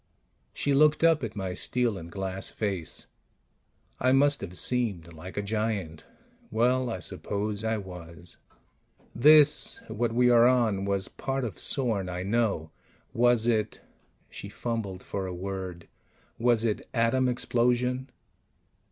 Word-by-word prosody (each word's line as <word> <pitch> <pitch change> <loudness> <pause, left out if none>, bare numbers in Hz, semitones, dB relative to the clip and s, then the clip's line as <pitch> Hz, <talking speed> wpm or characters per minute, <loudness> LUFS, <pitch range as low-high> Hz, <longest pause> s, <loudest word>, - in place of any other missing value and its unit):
She 145 - 0
looked 150 +3 +4
up 165 -4 +4
at 110 -2 -4
my 95 -3 -3
steel 120 +3 0
and 85 -2 -9
glass 95 0 -4
face; 95 -6 -4 0.9
I 130 - +3
must 140 +1 +4
have 90 -2 -7
seemed 100 -10 -1
like 90 +5 -10
a 105 - -1
giant. 100 -6 -3 0.4
Well, 125 +2 +1
I 115 - -3
suppose 105 +4 -4
I 110 0 0
was. 90 -3 -10 0.8
"This 150 +3 +5
what 120 +1 -1
we 125 +1 +4
are 120 0 +6
on 115 -6 +2
was 100 -1 -1
part 135 0 -3
of 115 -5 -5
Sorn, 110 -9 0
I 90 0 -4
know. 100 -7 0 0.4
Was 120 -1 +3
it 110 -2 0 0.2
" - - -40
She - - -8
fumbled 105 -6 -4
for 95 -1 -4
a 90 - -5
word 95 -2 -6 0.5
"was 115 -1 +2
it 110 -2 -2
atom 125 +2 +2
explosion?" 125 +1 0
110 Hz, 140 wpm, -28 LUFS, 95-125 Hz, 0.9 s, are